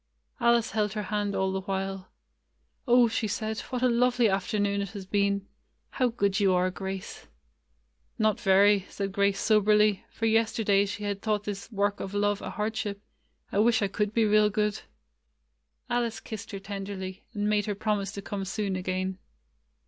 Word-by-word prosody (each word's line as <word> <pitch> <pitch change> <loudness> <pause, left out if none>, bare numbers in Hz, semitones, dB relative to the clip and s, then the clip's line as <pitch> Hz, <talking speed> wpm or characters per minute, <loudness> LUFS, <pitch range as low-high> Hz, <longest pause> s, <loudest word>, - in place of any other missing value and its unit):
Alice 235 -1 +3
held 210 -2 0
her 210 -1 -3
hand 205 -1 0
all 190 0 +1
the 190 0 -2
while. 195 0 -4 0.8
"Oh!" 245 0 +6
she 220 0 -1
said, 215 +1 -3
"what 250 -1 -4
a - - +6
lovely 245 0 +3
afternoon 200 +1 0
it 200 - -3
has 200 -3 -7
been! 200 0 0 0.4
How 255 - +1
good 200 -4 0
you 195 -2 +4
are, 180 +1 +2
Grace 190 +1 -6 0.5
!" - - -44
"Not 215 -3 +2
very," 195 0 +4
said 195 -1 -3
Grace 200 0 +1
soberly, 210 -1 +3
for 225 - -4
yester 225 0 +2
day 200 -1 +3
she 210 +1 -5
had 200 -1 -3
thought 210 -2 0
this 205 +2 -6
work 205 -1 0
of 195 +1 -5
love 205 0 +1
a - - -5
hard 215 +2 -2
ship. 200 -2 -3 0.5
"I 200 - +1
wish 225 0 +4
I - - +2
could 205 +1 -1
be 225 0 +2
real 210 0 +4
good." 210 0 -1 1.1
Alice 240 -2 -1
kissed 220 0 -8
her 200 - -5
tenderly, 195 -1 -6
and 205 0 0
made 210 -1 +1
her 205 - -1
promise 200 -1 -1
to 200 - -6
come 200 -1 -4
soon 195 0 -2
again. 185 +1 -2
205 Hz, 180 wpm, -28 LUFS, 195-215 Hz, 1.1 s, Oh